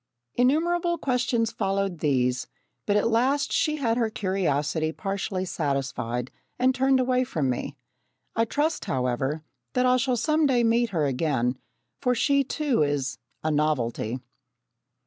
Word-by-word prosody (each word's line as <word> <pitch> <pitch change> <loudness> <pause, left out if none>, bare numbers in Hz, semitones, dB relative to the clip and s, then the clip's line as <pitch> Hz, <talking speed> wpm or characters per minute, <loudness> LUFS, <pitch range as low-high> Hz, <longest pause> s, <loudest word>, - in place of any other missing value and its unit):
Innumerable 340 +7 +2
questions 250 -5 0
followed 195 -3 -1
these, 125 -4 +1 0.4
but 205 - +2
at 210 +2 +3
last 260 +5 +2
she 305 - +2
had 240 -6 0
her 230 -2 +1
curiosity 160 -6 0
partially 195 +1 -3
satisfied 135 -6 -2 0.3
and 255 +1 +3
turned 265 0 +3
away 255 0 +2
from 155 - -1
me. 125 - -4 0.6
I 230 - +3
trust, 295 +6 -1
however, 130 +4 -1 0.3
that 250 -1 +2
I 250 0 +4
shall 255 -1 +1
some 305 +4 +2
day 245 -3 +3
meet 230 +1 +3
her 165 -7 0
again, 130 -3 0 0.4
for 250 -2 +2
she 280 +3 +3
too 280 - 0
is 145 -2 0 0.2
"a 155 - +1
novelty!" 130 -6 0
205 Hz, 140 wpm, -26 LUFS, -, 0.6 s, I